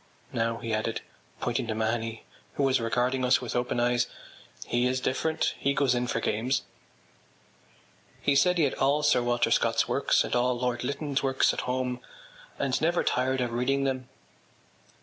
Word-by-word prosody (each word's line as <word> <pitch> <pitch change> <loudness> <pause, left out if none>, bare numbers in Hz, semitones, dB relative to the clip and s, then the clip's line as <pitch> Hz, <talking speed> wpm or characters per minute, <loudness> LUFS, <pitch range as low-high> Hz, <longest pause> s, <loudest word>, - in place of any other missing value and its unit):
Now,” 115 0 0
he 115 -1 -4
added, 110 +1 -1 0.4
pointing 120 -1 -1
to 110 - -2
Mahony 110 0 -2 0.3
who 140 - 0
was 130 -2 +3
regarding 125 +3 0
us 125 +1 +4
with 125 - -5
open 120 0 0
eyes, 120 0 +2 0.6
“he 120 +1 +1
is 130 +1 0
different; 155 +5 0
he 140 0 +1
goes 135 -3 +3
in 125 0 -1
for 115 - -1
games.” 115 +4 0 1.6
He 140 - +1
said 180 +6 +4
he 165 - +3
had 140 - +1
all 145 +3 +1
Sir 145 -4 +4
Walter 120 -1 +1
Scott’s - - +2
works - - +2
and - - -2
all 125 0 +2
Lord 125 -1 -1
Lytton’s 140 +1 -2
works 135 -1 +2
at - - -3
home 125 -1 -1 0.6
and 135 -2 0
never 170 +2 +2
tired 130 +1 +1
of 120 -2 -2
reading 135 +3 +1
them. 130 -2 -2
125 Hz, 170 wpm, -28 LUFS, 120-135 Hz, 1.6 s, us